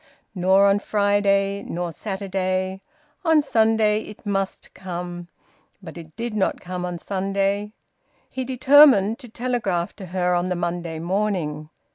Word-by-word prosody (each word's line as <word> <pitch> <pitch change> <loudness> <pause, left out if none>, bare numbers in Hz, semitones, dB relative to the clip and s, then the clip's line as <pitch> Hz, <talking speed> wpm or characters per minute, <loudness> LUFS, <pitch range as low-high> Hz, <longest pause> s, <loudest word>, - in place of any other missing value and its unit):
Nor 190 +1 +4
on 200 0 +4
Friday 200 -1 +1
nor 175 0 -4
Saturday. 190 0 -3 0.4
On 325 -3 +4
Sunday 220 -5 +2
it 210 +1 -12
must 195 -1 -3
come. 175 -1 -6 0.5
But 190 - -11
it 160 -2 -11
did 235 -1 -4
not 195 -3 0
come 180 0 -5
on 175 -1 -4
Sunday. 195 +2 -2 0.5
He 260 - -4
determined 260 -4 +5
to 245 -4 -12
telegraph 220 -8 -2
to 190 - -8
her 180 0 0
on 175 +1 0
the 180 - 0
Monday 170 -1 -3
morning. 170 -4 -2
195 Hz, 135 wpm, -23 LUFS, 180-210 Hz, 0.5 s, determined